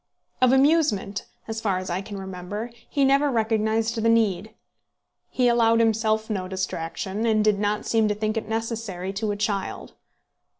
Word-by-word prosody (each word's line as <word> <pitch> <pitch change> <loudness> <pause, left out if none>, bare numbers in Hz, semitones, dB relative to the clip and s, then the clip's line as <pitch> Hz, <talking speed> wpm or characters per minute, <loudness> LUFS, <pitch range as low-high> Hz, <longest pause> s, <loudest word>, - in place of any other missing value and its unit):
Of 255 -1 +5
amusement, 265 -8 +2 0.2
as 220 0 -4
far 195 -4 0
as 185 0 -4
I 180 +2 -1
can 200 0 -8
remember, 190 +4 -6 0.2
he 280 -2 +2
never 275 +2 +3
recognised 225 -1 0
the 230 - +3
need. 220 -2 +2 0.8
He 250 -1 +1
allowed 230 -1 +4
himself 220 -1 +1
no 190 -4 -3
distraction, 190 +3 -3
and 215 -1 +2
did 210 -2 +3
not 205 0 -1
seem 225 -1 +2
to 210 - 0
think 215 +1 -2
it 225 - -2
was - - -13
necessary 220 -5 -3
to 215 +2 -2
a 205 - -1
child. 205 -2 -3
220 Hz, 170 wpm, -24 LUFS, 200-230 Hz, 0.8 s, Of